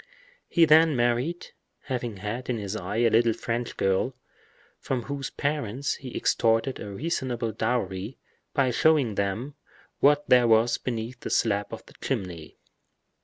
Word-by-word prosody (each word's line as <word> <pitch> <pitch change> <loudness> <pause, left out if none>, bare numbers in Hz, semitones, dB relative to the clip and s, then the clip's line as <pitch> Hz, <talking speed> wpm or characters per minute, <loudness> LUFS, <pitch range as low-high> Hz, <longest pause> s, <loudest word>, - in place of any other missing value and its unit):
He 170 -2 +5
then 160 0 +6
married, 120 +8 0 0.3
having 120 -5 -4
had 110 +6 -5
in 120 - 0
his 100 -1 -4
eye 100 0 -4
a 115 0 +3
little 115 0 +4
French 120 +2 -4
girl, 95 +7 +1 0.6
from 125 -3 -2
whose 140 +1 -4
parents 140 -3 -2
he 130 -3 -7
extorted 115 +3 +1
a 105 - -6
reasonable 120 -1 -2
dowry 110 -1 -2 0.4
by 130 -2 +3
showing 145 -3 +3
them 100 +8 -2 0.5
what 145 +1 +4
there 125 -1 +5
was 115 +1 +4
beneath 120 0 -4
the - - -6
slab 105 -2 +1
of - - -8
the - - -17
chimney. 85 -4 -4
120 Hz, 145 wpm, -26 LUFS, 110-135 Hz, 0.6 s, then